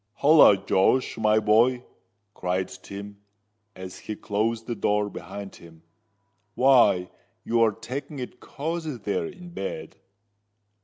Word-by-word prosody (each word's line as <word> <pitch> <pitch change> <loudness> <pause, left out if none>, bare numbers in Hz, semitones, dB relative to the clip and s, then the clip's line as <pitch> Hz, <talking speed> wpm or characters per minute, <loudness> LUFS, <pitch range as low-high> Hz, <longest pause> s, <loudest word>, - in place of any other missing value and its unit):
"Holloa! 145 -8 +6
Josh, 95 +6 +1
my 110 0 +3
boy!" 120 +4 +3 0.5
cried 90 +1 -2
Tim, 100 0 -10 0.6
as 95 0 -9
he 110 - -6
closed 110 +3 -2
the 120 - -3
door 105 -2 0
behind 100 -1 -8
him. 80 -1 -16 0.7
"Why, 125 -9 +4 0.3
you 115 0 +1
are 115 -1 +4
taking 130 +7 -7
it 125 -1 -7
cozie 155 -1 -5
there 100 -6 -2
in 180 -1 -11
bed." 95 - -6
110 Hz, 120 wpm, -25 LUFS, 100-125 Hz, 0.7 s, Holloa